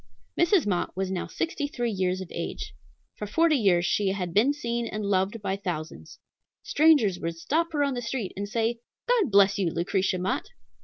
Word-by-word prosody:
Mrs. 345 +1 +3
Mott 180 -2 -1
was 190 0 -1
now 185 - -3
sixty 325 -3 -2
three 240 -5 -2
years 185 -2 -1
of 185 - -8
age. - - -5 0.4
For 210 - -5
forty 325 +8 +3
years 190 -8 +3
she 205 +2 +1
had 180 -4 -4
been 225 +9 +4
seen 235 -5 -3
and 215 -1 -4
loved 200 +2 0
by 190 - -1
thousands. 155 - -6 0.5
Strangers 285 - +4
would 165 0 -3
stop 330 - 0
her 290 -1 +2
on 280 -1 0
the 245 - -3
street 230 -4 -4
and 200 +1 -4
say, 230 +1 0 0.3
"God 475 - +3
bless 200 -1 +4
you, 185 -4 +1
Lucretia 185 +3 0
Mott!" 180 +1 -2
205 Hz, 190 wpm, -26 LUFS, 185-270 Hz, 0.5 s, been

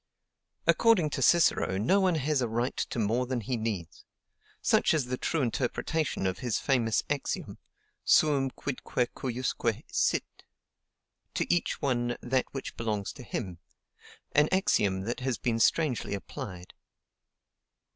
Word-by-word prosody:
According 195 -10 +4
to 135 - -2
Cicero, 155 - +4
no 185 - +3
one 185 -3 +3
has 150 -2 +1
a 120 - +1
right 120 +3 -1
to - - -3
more 115 +3 +1
than 130 -1 -1
he 125 +4 -2
needs: 105 - -4 0.6
such - - +3
is 150 -5 +1
the 125 +1 -2
true 160 -4 0
interpretation 130 +1 -1
of 95 -1 -1
his 120 -5 -1
famous 120 -5 +1
axiom 145 -1 -3 0.4
suum 140 -3 +4
quidque 125 -2 -3
cujusque 130 0 -2
sit, - - 0 0.9
to - - +1
each 175 -2 -1
one 120 -3 0
that 130 +1 0
which 135 - -6
belongs 105 -4 -2
to 140 - -11
him 95 -7 -5 0.7
an 150 +1 +4
axiom 105 - +2
that 115 +5 -3
has 130 -2 -1
been 115 -2 -1
strangely 130 -5 +2
applied. 95 -4 -8
125 Hz, 135 wpm, -29 LUFS, 115-145 Hz, 0.9 s, According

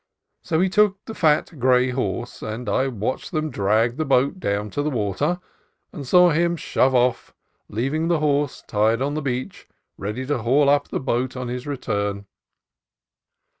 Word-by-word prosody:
So 160 -2 -1
he 190 - +3
took 200 0 +2
the 225 - -7
fat 155 -3 +1
gray 125 0 +3
horse, 120 -1 -3
and 110 +2 -5
I 130 +6 +1
watched 120 - -3
them 155 -3 -2
drag 110 +4 +1
the 155 - 0
boat 140 +4 +2
down 105 - -2
to 145 - -2
the 150 - 0
water, 130 - -1 0.5
and 140 -3 -7
saw 180 +4 +6
him 170 +2 +1
shove 130 -5 +1
off, 125 0 +1 0.3
leaving 135 +9 -1
the 170 -1 +2
horse 145 -2 0
tied 110 +2 +1
on 145 +1 -1
the 155 - -2
beach 130 -2 -4 0.3
ready 105 +6 -4
to 145 -1 -1
haul 135 +5 +3
up 145 0 +3
the - - -3
boat 130 0 -1
on 125 -1 -4
his 125 +2 -5
return. 100 -7 -2
130 Hz, 170 wpm, -23 LUFS, 115-150 Hz, 0.5 s, saw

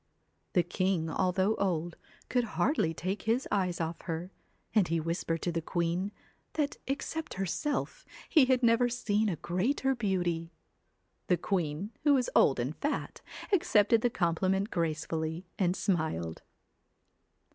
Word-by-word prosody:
The 175 - +4
king, 175 -2 0
although 190 +3 +2
old, 175 -3 -1 0.3
could 250 -1 +1
hardly 265 - +2
take 185 +5 -3
his 245 +4 +2
eyes 185 -4 +1
off 165 0 -3
her, 170 +2 -4 0.4
and 210 -5 +4
he 165 0 +1
whispered 165 0 -2
to 175 - 0
the 165 0 -1
queen, 175 +4 -1 0.4
that 295 -2 -1
except 280 +4 -3
herself, 290 - -2 0.2
he 305 -5 +6
had 255 -1 +2
never 235 +1 +4
seen 220 -3 +1
a 180 - -1
greater 235 - 0
beauty. 175 -7 -1 0.7
The 180 - +3
queen, 175 +1 -1
who 290 -2 +5
was 255 -2 0
old 135 - +5
and 130 +6 -2
fat, 295 - -3 0.3
accepted 225 - +4
the 245 - +3
compliment 190 +2 0
gracefully, 160 0 -2
and 180 -2 +2
smiled. 155 - -1
185 Hz, 135 wpm, -31 LUFS, 165-230 Hz, 0.7 s, he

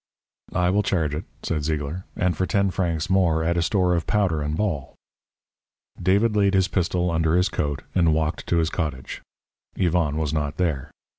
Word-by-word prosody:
"I 90 0 +2
will 100 +2 +3
charge 85 -7 0
it," 75 +4 -4 0.2
said 75 -3 -1
Zeigler. 75 +3 -3
"And, 90 -2 +1
for 95 +3 -1
ten 100 -1 +1
francs 85 -4 -1
more, 90 -4 +2
add 85 +1 +1
a 85 - +2
store 90 +1 +2
of 85 -1 -1
powder 95 -7 +1
and 75 +1 -2
ball." 85 -10 -2 1.1
David 100 +5 +3
laid 100 -1 +3
his 95 -1 +3
pistol 90 -1 0
under 80 0 +2
his 90 +2 +3
coat 75 -5 -2
and 85 -3 +3
walked 80 +1 -1
to 85 - +2
his 80 0 +1
cottage. 70 -7 -4 0.5
Yvonne 85 -5 +1
was 80 -2 -1
not 75 -1 -2
there. 80 -8 -1
85 Hz, 180 wpm, -24 LUFS, 80-95 Hz, 1.1 s, will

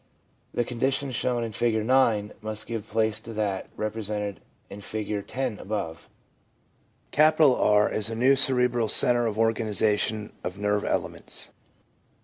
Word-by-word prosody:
The 120 - 0
condition 135 +3 -1
shown 125 -1 0
in 115 - -4
Figure 110 0 0
9 115 -4 +2
must 110 0 -5
give 115 -2 -5
place 110 -1 0
to 115 - -9
that 105 -3 -2
repre 110 +1 -3
sented 105 -2 -3 0.3
in 100 +1 -10
Figure 105 0 -3
10 125 0 -4
above. 85 -5 -5 1.1
R 150 -9 +5
is 110 0 -2
a 115 - -4
new 130 +4 +4
cerebral 125 -3 +3
centre 120 +1 +3
of 110 -1 -3
organisation 110 -1 +1
of 90 +1 -5
nerve 105 0 0
elements. - - -2
110 Hz, 135 wpm, -26 LUFS, 105-120 Hz, 1.1 s, R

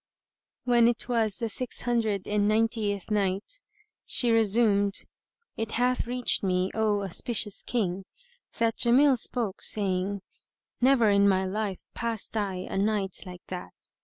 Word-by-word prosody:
When 240 -2 +4
it 240 0 -1
was 225 -5 0
the 230 - -2
Six 245 +3 -3
Hundred 220 -5 -1
and 205 0 +1
Ninetieth 215 -2 0
Night, 205 - -1 0.4
She 240 -2 +2
resumed, 210 -2 +2 0.5
It 225 0 -3
hath 250 0 0
reached 250 0 +1
me, 185 -1 0
O 210 -2 0
auspicious 210 +2 -1
King, 195 -5 -2 0.5
that 230 -1 +1
Jamil 260 +3 +5
spoke, 225 -4 -2
saying:—Never 205 +5 0
in 200 0 +4
my 190 -1 +1
life 200 0 -3
passed 230 -2 -3
I 200 -3 -1
a - - -4
night 200 -2 0
like 180 0 -11
that. 180 - -7
215 Hz, 135 wpm, -27 LUFS, 195-235 Hz, 0.5 s, Jamil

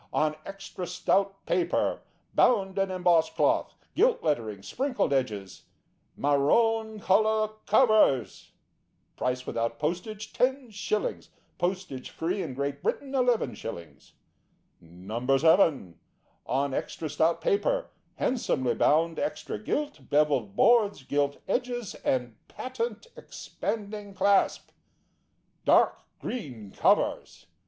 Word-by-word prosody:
On 155 0 +1
extra 195 -2 -7
stout 195 +2 0
paper, 350 -1 0 0.3
bound 195 -5 +3
in 195 0 +1
embossed 180 -3 +2
cloth, - - +1 0.2
gilt 480 +1 +2
lettering, 110 -10 -1
sprinkled 250 - -1
edges. 105 -8 -2 0.5
Marone 220 +11 +2
colour 215 +2 +2 0.2
covers. 215 - +3 0.6
Price 125 0 -2
without 115 0 -2
postage, 180 - -4
10/; 225 -6 -1 0.3
post 185 -2 -2 0.2
free 180 +5 -2
in 130 - -5
Great 140 +1 -3
Britain, 275 -2 -2
11/. 225 - -2 0.7
No. 105 +11 -2
7. 155 - +3 0.5
On 135 +1 0
extra 160 - -3
stout 160 +3 +1
paper, - - 0 0.2
handsomely 130 - 0
bound, 165 +7 +2
extra 295 - -3
gilt, 290 - -3
bevelled 140 -9 +2
boards, 210 - +4
gilt 140 +1 0
edges, 245 -4 -2
and 125 -4 -1
patent 240 -4 -5
expanding 205 -2 -6
clasp. 200 0 +2 0.9
Dark - - +4 0.2
green 125 - -6
covers. - - +1
180 Hz, 100 wpm, -28 LUFS, 135-220 Hz, 0.9 s, boards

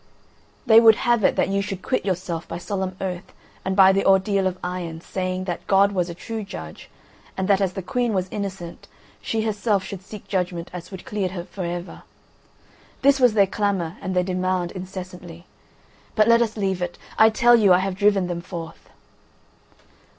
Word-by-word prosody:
"They 225 0 +8
would 225 -2 +7
have 240 -2 +1
it - - +3
that - - +1
you 200 0 +1
should 195 -1 -5
quit 255 - -1
yourself 180 -3 -3
by 170 - -5
solemn 190 +1 -3
oath 185 -1 -5 0.3
and 190 0 -1
by 190 -1 +7
the 195 +1 +1
ordeal 195 0 +3
of 185 -1 -3
iron, 180 -2 -4
saying 185 +1 -3
'that 175 -2 -5
God 200 +1 +4
was 180 -3 -1
a 170 - -6
true 220 +4 -5
judge, 80 - -9 0.5
and 190 -1 -1
that 200 -1 +3
as 190 -2 0
the 190 - -5
Queen 240 +4 -1
was 185 -3 -1
innocent, 190 -4 -6 0.3
she 220 - -1
herself 210 -2 0
should 190 -2 -7
seek 205 +1 -10
such - - -22
judgment 180 -3 -2
as 180 -2 -8
would 190 -2 -9
clear 200 -3 -2
her 175 -1 -6
for 185 -1 -6
ever.' 175 +1 -5 1.0
This 275 0 +5
was 250 -3 +5
their 200 -2 +6
clamour 195 -4 -1
and 185 0 -3
their 180 - +3
demand 185 -1 -1
incessantly. 180 -2 -9 0.7
But 215 0 +4
let 230 0 +5
us 225 -1 -1
leave 190 -3 -1
it. 175 0 -3 0.2
I 220 0 +8
tell 240 +2 +5
you, 210 -5 +4
I 180 - +7
have 190 +1 -1
driven 200 0 +2
them 175 -1 -4
forth." 170 -2 -9
190 Hz, 195 wpm, -23 LUFS, 180-205 Hz, 1.0 s, They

